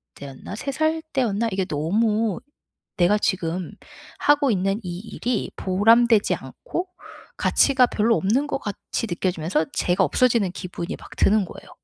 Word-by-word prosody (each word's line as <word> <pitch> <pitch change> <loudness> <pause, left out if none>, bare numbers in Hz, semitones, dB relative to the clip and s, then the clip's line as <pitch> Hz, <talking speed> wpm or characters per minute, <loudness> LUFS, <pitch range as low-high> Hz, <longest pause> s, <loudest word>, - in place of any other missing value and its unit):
때였나? 140 +7 -9
3 275 +6 -4
살 315 +3 0
때였나? 230 -4 0
이게 190 -1 -1
너무 210 +6 0 0.6
내가 180 +4 +4
지금 180 -3 -1 0.5
하고 290 -2 +3
있는 195 +2 0
이 175 -1 -5
일이 230 +1 -3
보람되지 225 +3 +4
않고 370 -7 -6 0.5
가치가 265 -3 +4
별로 225 +1 +2
없는 245 +10 +1
것 285 - -1
같이 205 +1 -4
느껴지면서 175 -2 -1
제가 185 +2 +1
없어지는 225 - +2
기분이 180 -2 -5
막 - - -13
드는 205 -1 +3
거예요. - - -12
205 Hz, 295 characters per minute, -23 LUFS, 180-235 Hz, 0.6 s, 내가